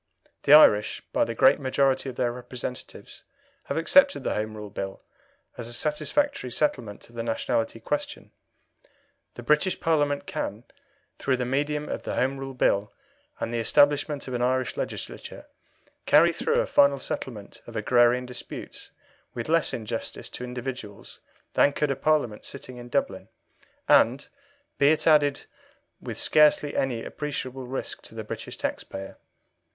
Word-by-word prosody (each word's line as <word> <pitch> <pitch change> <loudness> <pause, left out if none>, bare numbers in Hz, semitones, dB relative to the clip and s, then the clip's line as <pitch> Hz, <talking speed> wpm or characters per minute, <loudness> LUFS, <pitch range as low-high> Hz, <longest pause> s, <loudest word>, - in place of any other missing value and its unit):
The 140 - +6
Irish, 105 -9 +6
by - - +3
the 115 - -5
great 130 - +5
majority 135 0 +1
of 125 - -8
their 120 -1 0
representatives, 125 0 -8 0.4
have - - -3
accepted 280 +12 +4
the - - -1
Home 110 0 -3
Rule 105 -1 -8
Bill 95 -1 -6 0.6
as 115 - -4
a 120 - -5
satisfactory 155 - -1
settlement 120 -5 -2
of 120 - -20
the 115 - -3
nationality 115 0 -1
question. 290 - -4 1.0
The 120 - -8
British 150 +8 +2
Parliament 145 -3 +1
can, 105 +4 -4 0.6
through 130 -2 +1
the 125 - -2
medium 145 +3 -1
of - - -4
the - - -4
Home 135 +2 0
Rule 135 -1 -6
Bill 100 -4 +1 0.5
and 115 - -3
the 120 - 0
establishment 145 +4 +2
of 130 - -5
an 120 - -2
Irish 130 +1 0
Legislature, - - -6 0.6
carry - - +6
through - - -1
a - - +1
final 140 0 +4
settlement 115 -5 -6
of - - -10
agrarian 120 0 +3
disputes 125 0 -8 0.5
with 120 +4 -4
less 165 -1 +3
injustice 115 0 -5
to - - -7
individuals 125 -4 -7 0.3
than 140 - +4
could 150 -1 0
a - - 0
Parliament 140 -8 0
sitting 130 -2 -9
in 120 0 -10
Dublin, 95 -3 -2 0.6
and, 130 +5 +4 0.5
be 140 - +6
it 155 - 0
added, 145 -3 +4 0.6
with - - -7
scarcely 150 -1 +4
any 125 -4 -1
appreciable 135 -3 -5
risk 130 +2 -5
to - - -14
the - - -5
British - - -7
taxpayer. 95 0 -5
130 Hz, 150 wpm, -26 LUFS, 115-145 Hz, 1.0 s, The